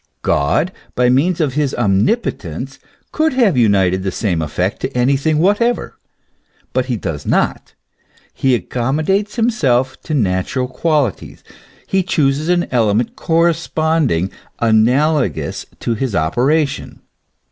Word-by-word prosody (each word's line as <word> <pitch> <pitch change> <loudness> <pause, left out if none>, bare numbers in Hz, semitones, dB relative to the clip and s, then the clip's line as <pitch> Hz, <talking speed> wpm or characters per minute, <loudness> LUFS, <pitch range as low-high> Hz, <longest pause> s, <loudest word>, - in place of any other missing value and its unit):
God, 70 - +1 0.2
by 125 0 +3
means 160 +8 +2
of 150 -5 0
his 145 -1 0
omnipo 115 - +2
tence, - - -8 0.3
could 315 -1 +1
have 235 - +3
united 95 -6 +2
the 95 - -2
same 90 -5 -1
effect 90 +5 -2
to 130 - -2
anything 140 +5 +2
whatever. 205 +8 +1 0.8
But 130 0 0
he 125 -3 -1
does 80 -8 -4
not; - - -1 0.6
he 130 -2 +2
accommodates 155 - -1
himself 135 - +1
to 155 - -3
natural 110 +3 0
quali 145 -2 +1
ties; - - -14 0.4
he 190 - +1
chooses 150 -3 0
an 175 -1 +2
element 115 -1 +1
corresponding, 160 - +1 0.3
analogous 120 - +1
to 120 - -1
his 115 -1 -2
operation. 135 - 0
130 Hz, 125 wpm, -17 LUFS, 110-160 Hz, 0.8 s, by